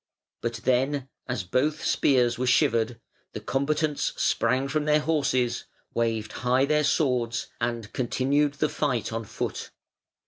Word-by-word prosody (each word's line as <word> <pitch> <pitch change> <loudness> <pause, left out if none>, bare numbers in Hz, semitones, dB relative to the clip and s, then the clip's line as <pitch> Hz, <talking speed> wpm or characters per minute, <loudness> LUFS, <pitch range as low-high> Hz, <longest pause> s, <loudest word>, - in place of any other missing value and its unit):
But 115 -2 -3
then, 135 +2 +1 0.2
as 120 -7 -2
both 135 - 0
spears 120 -3 +2
were 130 - 0
shivered, 115 -1 +2 0.3
the - - -4
combatants 150 +2 0
sprang 130 +4 +1
from 150 +2 -1
their 150 0 +4
horses, 130 -6 0 0.3
waved 115 -2 -1
high 130 +2 +3
their 150 +1 +2
swords, 125 -6 +1
and 115 -2 -3
continued 140 +3 +1
the 150 +2 0
fight 125 -7 -1
on 115 0 -3
foot. - - -4
130 Hz, 135 wpm, -26 LUFS, 120-145 Hz, 0.3 s, their